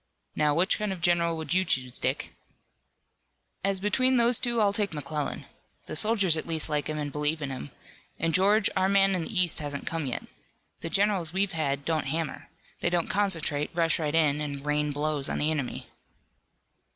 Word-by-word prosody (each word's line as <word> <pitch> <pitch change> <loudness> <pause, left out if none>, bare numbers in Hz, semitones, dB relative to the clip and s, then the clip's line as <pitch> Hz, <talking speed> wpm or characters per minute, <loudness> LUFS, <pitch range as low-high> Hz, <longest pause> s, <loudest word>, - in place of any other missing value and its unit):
Now, 150 -1 +2
which 180 +4 +2
kind 210 -1 -1
of 190 - -4
a - - -16
general 170 -1 +2
would 160 -1 -3
you 185 +1 +3
choose, 130 -8 -1
Dick?" - - -2 1.3
"As 195 0 +1
between 255 +6 +2
those 235 0 +4
two 240 -2 0
I'll 205 -2 +3
take 205 -5 0
McClellan. 150 0 -4 0.4
The - - -6
soldiers 200 -2 +3
at 155 - -3
least 160 -2 0
like 150 -2 -1
him 155 - -2
and 145 -1 -3
believe 150 +2 0
in 140 -2 -4
him. 130 - -6 0.5
And 165 0 0
George, 200 +4 +4
our 190 0 +2
man 195 0 +4
in 185 - 0
the 185 +4 -1
east 180 -3 +2
hasn't 145 -2 -4
come 165 -3 -3
yet. 125 - -3 0.6
The 165 - -5
generals 195 -4 +1
we've 195 +1 +1
had 140 -4 -2
don't 160 -3 -1
hammer. 160 +1 -3 0.3
They - - 0
don't 175 -1 0
concentrate, 165 -7 0
rush 165 -1 +2
right 150 -1 -1
in 150 -2 +2
and 140 -1 -5
rain 150 0 0
blows 145 -1 0
on - - -2
the 155 +1 +1
enemy." 140 -5 -3
165 Hz, 195 wpm, -27 LUFS, 150-190 Hz, 1.3 s, those